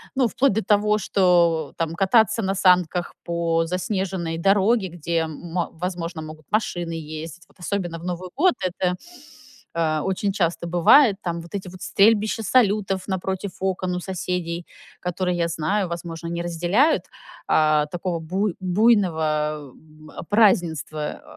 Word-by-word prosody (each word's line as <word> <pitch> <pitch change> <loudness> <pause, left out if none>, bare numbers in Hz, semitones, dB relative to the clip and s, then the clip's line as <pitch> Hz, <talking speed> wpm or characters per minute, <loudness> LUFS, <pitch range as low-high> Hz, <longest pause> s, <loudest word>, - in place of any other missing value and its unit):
Ну, 260 -2 +3
вплоть 255 +4 +2
до 220 +2 -1
того, 210 0 +2
что 170 -6 +2
там: 165 0 -2
кататься 220 +4 +3
на 195 0 0
санках 180 -2 +2
по 170 -1 0
заснеженной 180 -1 -2
дороге, 195 +4 +3
где, 170 0 -2
м, 160 +2 -8 0.2
возможно, 170 -1 -4
могут 155 -1 -10
машины 175 -6 -1
ездить, 160 +1 -7
вот - - -27
особенно 180 -2 -3
в 170 - -10
Новый 180 0 -4
год. 360 +4 +4
Это, 180 0 -1 0.8
э, 160 -2 0
очень 190 +4 -1
часто 170 -3 -1
бывает 185 - +5
там. 170 -1 -3
Вот 170 +2 -13
эти 195 -2 -4
вот 185 0 -12
стрельбища 215 +2 +3
салютов 205 -4 +2
напротив 190 0 -3
окон 185 -1 -1
у - - -3
соседей, 180 -2 -4 0.3
которые, 180 0 -2
я 170 -1 +1
знаю, 170 +4 -1
возможно, 170 -1 -6
не 170 0 -3
разделяют, 175 - +2 0.4
э, 155 -1 +3
такого 175 -1 -2
буй 185 +4 -2
буйного, 160 - +1
м, 155 0 -17 0.2
празднества. 170 -8 +1
180 Hz, 140 wpm, -23 LUFS, 165-195 Hz, 0.8 s, бывает